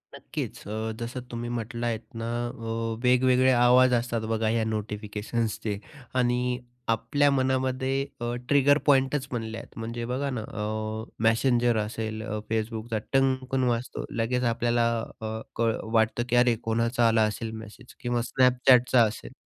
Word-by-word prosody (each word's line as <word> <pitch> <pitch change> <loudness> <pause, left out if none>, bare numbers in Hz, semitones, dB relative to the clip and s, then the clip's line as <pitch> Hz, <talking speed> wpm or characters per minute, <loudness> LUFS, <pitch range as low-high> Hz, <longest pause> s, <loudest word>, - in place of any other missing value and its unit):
नक्कीच. - - -6
अ, 110 +1 -3
जसं 120 +2 -4
तुम्ही 120 0 -4
म्हटलं 120 0 -3
आहेत 115 -2 -1 0.2
ना, 115 0 -4 0.2
अ, 115 0 -4
वेगवेगळे 125 +1 +4
आवाज 125 +1 +5
असतात 120 -1 0
बघा 110 0 +1
ह्या 110 0 +1
नोटिफिकेशन्सचे 105 0 -3 0.4
आणि 125 0 +1 0.3
आपल्या 115 +6 +2
मनामध्ये 130 0 0 0.2
अ, 120 0 -1 0.2
ट्रिगर 145 0 +5
पॉईंटच 135 0 +3
बनले 115 -2 -4
आहेत. 115 - -11
म्हणजे 115 +1 -4
बघा 130 +4 -2
ना, 125 -4 -3
अ, 110 +1 -5
Messenger 120 +1 +3
असेल, 110 0 -3
अ, 110 -1 -3
Facebookचा 110 0 -2 0.2
टंगकन 130 -1 +2
वाजतो, 120 +1 -2
लगेच 125 +2 0
आपल्याला 120 0 +1 0.4
अ, 110 0 -3 0.2
कळ 115 -1 +1 0.2
वाटतं 110 +1 +2
की 120 - +2
अरे 120 -1 +5
कोणाचा 115 +1 +2
आला 110 -1 +4
असेल 115 0 -5
मेसेज? 110 +3 -14
किंवा 120 -1 -1
Snapchatचा 125 -1 +5
असेल. 105 - -3
120 Hz, 140 wpm, -27 LUFS, 110-125 Hz, 0.4 s, आवाज